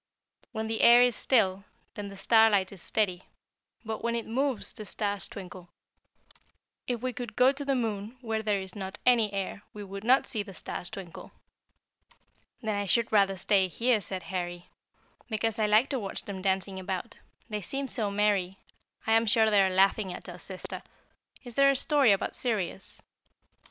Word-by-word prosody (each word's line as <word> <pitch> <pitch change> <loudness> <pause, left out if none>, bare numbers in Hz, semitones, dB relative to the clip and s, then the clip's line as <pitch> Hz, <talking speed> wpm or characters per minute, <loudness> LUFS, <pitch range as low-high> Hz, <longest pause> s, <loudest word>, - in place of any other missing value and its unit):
When 220 0 -3
the 225 0 -2
air 240 +1 +8
is 245 -2 +2
still 195 -7 +2 0.3
then 205 -1 -6
the 200 0 -10
starlight 205 -1 +4
is 195 -4 -11
steady, 185 -3 0 0.6
but 220 0 -5
when 235 0 0
it 230 - -3
moves 260 0 -1
the 215 - -7
stars 205 -1 -3
twinkle. 180 -2 -10 1.2
If 245 -1 -2
we 255 -1 -1
could 240 -4 -7
go 255 +1 +5
to 280 +1 -5
the 275 -1 0
moon, 220 -1 -3
where 225 -2 -2
there 210 -2 0
is 190 -1 -7
not 195 0 -6
any 230 -4 +4
air, 195 0 -4
we 210 - -7
would 195 0 -8
not 255 +4 +4
see 220 - -2
the 200 -2 -9
stars 175 - -5
twinkle." 185 -4 -9 1.3
"Then 215 -2 -1
I 205 - -1
should 230 +4 +1
rather 195 -2 +3
stay 190 +1 +3
here," 230 +4 +1
said 185 -1 -6
Harry, 175 0 -5 0.6
"because 225 0 -1
I 215 - +2
like 215 +5 +4
to 270 - -1
watch 195 -3 -5
them 195 -2 -6
dancing 190 0 -1
about. 190 +4 -5 0.3
They 210 -2 -4
seem 275 +8 -3
so 220 -5 +1
merry, 200 -2 +1 0.5
I 220 - 0
am 225 0 +4
sure 220 +1 +4
they 205 -1 +5
are 190 - +3
laughing 190 +1 +2
at - - -9
us, 175 -1 -9
sister. 185 +1 -5 0.6
Is 245 -2 -8
there 275 +3 +5
a 275 - +3
story 280 -3 +3
about 195 - 0
Sirius?" 200 -6 -3
210 Hz, 180 wpm, -28 LUFS, 190-230 Hz, 1.3 s, air